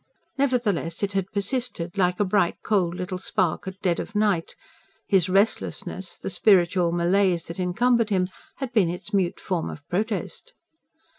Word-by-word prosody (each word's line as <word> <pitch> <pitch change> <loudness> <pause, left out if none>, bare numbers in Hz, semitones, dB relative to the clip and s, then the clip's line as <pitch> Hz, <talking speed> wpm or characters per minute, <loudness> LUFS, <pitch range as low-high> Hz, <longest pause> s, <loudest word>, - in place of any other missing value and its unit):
Nevertheless 235 -11 0
it 200 - 0
had 195 -1 -2
persisted, 200 -4 -2
like 180 -2 +1
a 205 - +3
bright 185 -2 +2
cold 180 -5 +1
little 180 0 -4
spark 185 -2 -1
at 190 0 -6
dead 175 -3 +1
of - - -6
night: 205 -5 +1 0.5
his 190 -3 +3
restlessness, 195 -2 0
the - - -5
spiritual 180 -2 +3
malaise 175 0 +2
that 170 +2 -8
encumbered 230 +5 +2
him 185 -3 +1 0.3
had 265 -3 -5
been 200 -7 +4
its 180 +4 -6
mute 185 -3 +1
form 175 -4 -2
of 145 - -10
protest. 220 - -3
190 Hz, 155 wpm, -25 LUFS, 175-210 Hz, 0.5 s, been